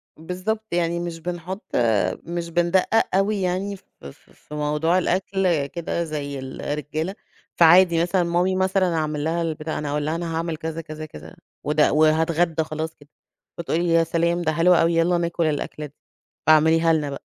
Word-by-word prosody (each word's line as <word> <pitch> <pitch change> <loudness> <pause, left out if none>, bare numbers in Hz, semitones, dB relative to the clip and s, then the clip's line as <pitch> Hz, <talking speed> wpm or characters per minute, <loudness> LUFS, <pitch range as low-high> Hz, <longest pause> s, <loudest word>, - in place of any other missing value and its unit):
بالضبط، 185 +7 -4
يعني 170 0 0
مش 170 -1 -5
بنحط 180 +3 -5 0.6
مش 170 0 -4
بندقق 175 +5 +1
أوي 200 +1 +1
يعني 185 +3 -1
ف 190 - -17 0.2
ف - - -9 0.2
في 150 - -12
موضوع 150 +4 +1
الأكل 185 -4 0
كده 170 +1 -3
زي 145 -3 -5
الرجالة. 150 +6 -4 0.4
فعادي 170 0 +6
مثلًا، 175 +1 +1
مامي 175 +2 +1
مثلًا 190 -2 +1
أعمل 150 -2 -2
لها 165 +2 -1
البتاع 160 -1 -3
أنا 150 -1 -3
هأقول 145 0 -1
لها 155 +2 -1
أنا 165 -1 -3
هاعمل 165 -1 -2
كذا، 160 0 -5
كذا، 155 -1 -8
كذا 80 - -12 0.3
وده 150 0 +2
وهاتغدى 160 +1 +2
خلاص 160 +1 -5
كده. 145 0 -20 0.5
فتقول 170 -1 -1
لي: 175 - 0
"يا 165 0 +4
سلام 170 +1 0
ده 160 -2 0
حلو 170 +3 +4
أوي، 165 0 +3
يالّا 170 +1 +2
ناكل 170 -1 -1
الأكل 150 0 -3
ده، 140 - -24 0.5
فاعمليها 160 +1 +5
لنا 150 -2 0
بقى." 140 - -7
165 Hz, 170 wpm, -23 LUFS, 155-175 Hz, 0.6 s, فعادي